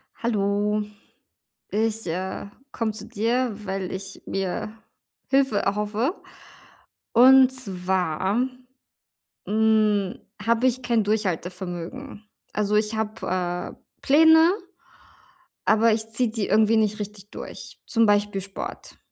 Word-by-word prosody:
Hallo, 210 Hz, -2 st, 0 dB, 0.9 s
ich, 220 Hz, -1 st, -1 dB
äh, 185 Hz, +4 st, -3 dB, 0.3 s
komme 225 Hz, -2 st, -1 dB
zu 215 Hz, -, -9 dB
dir, 235 Hz, +4 st, 0 dB
weil 190 Hz, -1 st, -3 dB
ich 190 Hz, 0 st, -7 dB
mir 195 Hz, +3 st, -3 dB, 0.5 s
Hilfe 270 Hz, -6 st, +2 dB
erhoffe, 210 Hz, -, -1 dB, 1.0 s
und 260 Hz, +2 st, +7 dB
zwar, 190 Hz, -1 st, -1 dB, 1.0 s
ähm, 215 Hz, -2 st, +2 dB
hm, -, -, -25 dB, 0.2 s
habe 230 Hz, +2 st, +2 dB
ich 255 Hz, 0 st, 0 dB
kein 235 Hz, -3 st, +1 dB
Durchhaltevermögen. 190 Hz, -, -3 dB, 0.3 s
Also, 210 Hz, 0 st, 0 dB
ich 215 Hz, +1 st, +1 dB
habe, 185 Hz, -5 st, -3 dB
äh, -, -, -36 dB, 0.2 s
Pläne, 320 Hz, +4 st, +6 dB, 1.1 s
aber 220 Hz, +1 st, +4 dB
ich 220 Hz, 0 st, -2 dB
ziehe 235 Hz, +1 st, 0 dB
die 220 Hz, -2 st, -2 dB
irgendwie 220 Hz, +1 st, +4 dB
nicht 215 Hz, -1 st, +1 dB
richtig 205 Hz, 0 st, -7 dB
durch, -, -, -9 dB
zum 230 Hz, -1 st, +3 dB
Beispiel 205 Hz, -1 st, +2 dB
Sport. 195 Hz, +1 st, -8 dB
215 Hz, 110 wpm, -24 LUFS, 195-230 Hz, 1.1 s, und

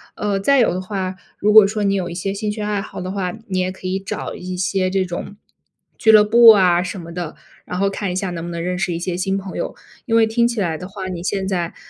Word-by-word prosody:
呃， 205 Hz, -1 st, -1 dB
再 275 Hz, +8 st, +3 dB
有 230 Hz, -, +3 dB
的 185 Hz, -, -3 dB
话， 190 Hz, -1 st, -4 dB, 0.2 s
如 210 Hz, +1 st, +2 dB
果 215 Hz, -2 st, +9 dB
说 210 Hz, +1 st, -2 dB
你 200 Hz, 0 st, +2 dB
有 185 Hz, -3 st, -1 dB
一 170 Hz, -, -7 dB
些 195 Hz, +2 st, -2 dB
兴 210 Hz, +1 st, -3 dB
趣 210 Hz, 0 st, -5 dB
爱 210 Hz, -1 st, -1 dB
好 -, -, -8 dB
的 185 Hz, +1 st, -4 dB
话， 190 Hz, -3 st, -2 dB, 0.2 s
你 185 Hz, -2 st, -1 dB
也 185 Hz, 0 st, 0 dB
可 190 Hz, -, -13 dB
以 190 Hz, +1 st, -1 dB
找 195 Hz, -, -5 dB
一 180 Hz, 0 st, -6 dB
些 185 Hz, 0 st, 0 dB
这 190 Hz, 0 st, 0 dB
种 175 Hz, +3 st, -6 dB, 0.6 s
俱 220 Hz, -, +5 dB
乐 215 Hz, -1 st, +8 dB
部 230 Hz, +2 st, +7 dB
啊， 180 Hz, -4 st, +6 dB
什 185 Hz, +1 st, -5 dB
么 170 Hz, 0 st, -9 dB
的， 170 Hz, -3 st, -5 dB, 0.3 s
然 180 Hz, -, -5 dB
后 200 Hz, -, +2 dB
看 195 Hz, -1 st, -3 dB
一 -, -, -4 dB
下 190 Hz, -1 st, -2 dB
能 165 Hz, -1 st, -5 dB
不 175 Hz, -, -5 dB
能 170 Hz, -1 st, -4 dB
认 180 Hz, +1 st, -2 dB
识 185 Hz, -, -1 dB
一 165 Hz, -, -2 dB
些 175 Hz, +1 st, -3 dB
新 190 Hz, +2 st, -1 dB
朋 190 Hz, -1 st, -6 dB
友。 -, -, -4 dB, 0.3 s
因 230 Hz, -, 0 dB
为 225 Hz, -1 st, +6 dB
听 235 Hz, +2 st, +2 dB
起 235 Hz, -2 st, -3 dB
来 165 Hz, -5 st, -1 dB
的 180 Hz, -, -7 dB
话， 190 Hz, -1 st, -6 dB
你 175 Hz, -2 st, -5 dB
现 190 Hz, +1 st, -2 dB
在， 175 Hz, -3 st, -2 dB
190 Hz, 300 characters per minute, -20 LUFS, 180-205 Hz, 0.6 s, 果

